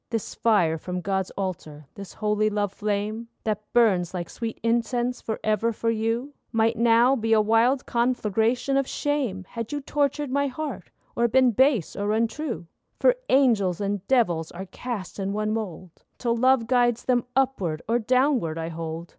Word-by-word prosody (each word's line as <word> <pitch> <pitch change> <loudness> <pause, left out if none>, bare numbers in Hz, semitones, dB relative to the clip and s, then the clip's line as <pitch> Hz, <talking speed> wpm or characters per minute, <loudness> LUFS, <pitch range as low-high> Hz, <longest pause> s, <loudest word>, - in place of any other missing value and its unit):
This 225 -3 -3
fire 175 -8 +2
from 180 +2 -4
God's 190 0 -1
altar, 160 -6 -5
this 200 -1 -10
holy 215 0 +1
love 205 -2 -1
flame, 210 +2 -2 0.2
That 215 -1 -3
burns 190 -7 +3
like 175 -1 -4
sweet 230 -2 -5
incense 240 +1 0
forever 220 +1 -1
for 230 +1 -1
you, 230 +5 -2 0.2
Might 225 0 +2
now 235 +3 +4
be 225 -3 +1
a 220 - +5
wild 225 +5 +3
conflagration 235 +2 +1
of 275 -1 +1
shame, 260 -11 -2
Had 230 -2 -5
you 290 - -2
tortured 285 0 -1
my 280 +1 +1
heart, 260 - -5 0.3
or 235 0 +3
been 255 +1 +4
base 255 - +2
or 205 +1 -1
untrue. 230 - -2 0.3
For - - +4
angels 220 -10 +3
and 200 -1 -2
devils 175 -11 +2
are 185 +2 -7
cast 205 0 -6
in 195 0 -2
one 215 +1 -1
mould, 185 -5 -5 0.3
Till 235 -2 0
love 255 0 +3
guides 240 -1 +2
them 245 -2 +2
upward 200 -13 0
or 235 +2 +2
downward, 250 - +1
I 165 0 -3
hold. 165 0 -5
225 Hz, 165 wpm, -25 LUFS, 195-250 Hz, 0.3 s, a